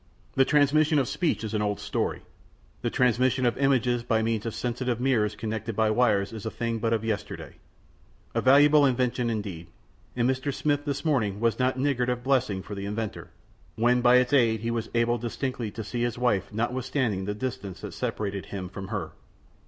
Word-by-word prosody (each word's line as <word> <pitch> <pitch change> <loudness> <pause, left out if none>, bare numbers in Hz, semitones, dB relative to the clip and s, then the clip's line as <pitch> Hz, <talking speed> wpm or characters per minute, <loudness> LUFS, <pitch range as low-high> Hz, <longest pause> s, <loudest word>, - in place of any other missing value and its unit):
The 135 - +4
transmission 150 +2 +3
of 135 -3 +2
speech 160 -1 -1
is 110 0 -4
an 105 - 0
old 105 -1 -1
story; - - -2 0.6
the - - 0
transmission 125 +1 +2
of 120 - +2
images 125 -3 +2
by 115 -2 +1
means 115 -1 -1
of 115 - -4
sensitive 125 0 -2
mirrors 115 -5 +1
connected 110 0 -4
by 110 0 +2
wires 110 -3 +2
is 110 -3 -7
a 110 - -2
thing 115 0 -3
but 115 +1 0
of 115 -1 0
yesterday. 110 -2 -4 0.8
A - - +1
valuable 145 +3 +6
invention 125 -2 +1
indeed, 100 -7 -4 0.5
and 120 -1 +2
Mr. 130 +2 0
Smith 145 +1 -1
this 140 0 -3
morning 110 -10 +1
was 115 +1 +1
not 130 0 +1
niggard 130 -2 +1
of 125 0 -2
blessings 125 -8 +1
for 105 - -7
the 100 0 -5
inventor, 105 +1 -4 0.5
when 120 +2 +3
by 125 0 +6
its 125 +2 +3
aid 115 -5 +3
he 115 +1 -2
was 115 -1 -3
able 120 0 +2
distinctly 120 0 -3
to 110 +2 -6
see 120 +3 -4
his 120 0 -1
wife 100 -6 0
notwithstanding 120 -2 -1
the 105 +1 -3
distance 105 -7 -5
that - - -7
separated 100 -2 -3
him 95 -2 -5
from 95 0 -7
her. 95 -7 -4
120 Hz, 190 wpm, -27 LUFS, 110-130 Hz, 0.8 s, valuable